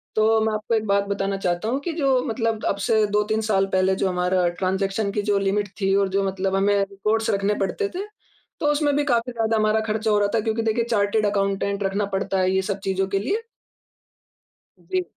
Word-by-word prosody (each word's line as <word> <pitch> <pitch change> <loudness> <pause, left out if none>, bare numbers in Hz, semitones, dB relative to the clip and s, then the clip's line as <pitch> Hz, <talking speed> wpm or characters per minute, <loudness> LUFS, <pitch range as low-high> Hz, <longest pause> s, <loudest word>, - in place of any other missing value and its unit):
तो 220 +1 +4
मैं 220 - 0
आपको 215 +2 -1
एक 220 0 0
बात 200 0 +2
बताना 195 0 -1
चाहता 180 +3 -1
हूँ 265 +3 0
कि 335 +2 -3
जो 270 -5 +2
मतलब 225 -1 -2
अब - - +1
से 220 -1 +3
2-3 210 +1 +1
साल 195 -1 +3
पहले 190 0 +3
जो 195 - 0
हमारा 180 0 +1
ट्रांज़ेक्शन 195 +2 0
की 210 - -1
जो 205 -1 +1
लिमिट 200 +1 0
थी 195 0 +2
और 200 -1 +2
जो 200 - +2
मतलब 190 0 -1
हमें 200 +1 +2
रिपोर्ट्स 215 +3 -1
रखने 200 +1 +1
पड़ते 405 - -2
थे, 395 +3 -3 0.5
तो - - -2
उसमें 290 -1 +1
भी 290 - +2
काफ़ी 240 -2 +1
ज़्यादा 225 -1 0
हमारा 215 0 +2
ख़र्च 220 +1 -2
हो 210 -1 +4
रहा 205 - +2
था - - +3
क्योंकि 225 +1 -1
देखिए, 225 +1 +1
चार्टेड 215 -1 +1
अकाउंटेंट 200 0 0
रखना 200 +1 0
पड़ता 195 0 -1
है 185 0 +2
ये 190 0 +2
सब 195 - -3
चीज़ों 190 0 0
के 195 0 0
लिए। 415 - -1 1.4
जी। 370 -1 -2
205 Hz, 215 wpm, -23 LUFS, 195-225 Hz, 1.4 s, तो